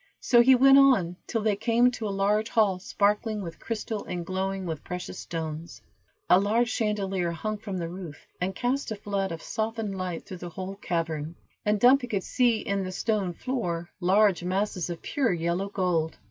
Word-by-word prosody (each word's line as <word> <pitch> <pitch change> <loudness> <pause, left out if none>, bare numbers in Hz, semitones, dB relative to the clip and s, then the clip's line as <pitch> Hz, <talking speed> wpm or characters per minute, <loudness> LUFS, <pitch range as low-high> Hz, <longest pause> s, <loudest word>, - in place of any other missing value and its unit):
So 240 -1 +5
he 260 +2 +7
went 270 +2 +7
on 225 -11 +4
till 225 -3 -1
they 215 -2 +2
came 235 +4 +3
to 230 -3 -4
a - - -2
large 205 +3 +1
hall 205 -5 +2
sparkling 210 +2 0
with 165 -2 -8
crystal, 220 -2 -4
and 175 -1 -4
glowing 190 +1 -2
with 160 -3 -4
precious 180 +1 -6
stones. 160 0 -5 0.5
A 180 - +6
large 225 +4 +2
chandelier 195 -5 -1
hung 215 +5 -4
from 200 -3 -5
the 170 -2 -3
roof, 175 -4 -9 0.2
and 190 +1 -1
cast 255 +5 -1
a 220 - -3
flood 200 -2 -2
of 165 -1 -6
softened 220 -2 -3
light 185 -3 -4
through 185 - -8
the 175 0 -7
whole 185 +3 -6
cavern, 165 -3 -3 0.3
and 210 0 +1
Dumpy 250 +3 +5
could 200 -5 -2
see 240 -4 +2
in 200 -1 -1
the 185 - -4
stone 200 -2 -1
floor 175 -7 -3
large 190 0 +3
masses 185 -1 -1
of 170 -1 -6
pure 265 -6 0
yellow 170 +3 -1
gold. 180 -5 0
195 Hz, 190 wpm, -27 LUFS, 175-220 Hz, 0.5 s, he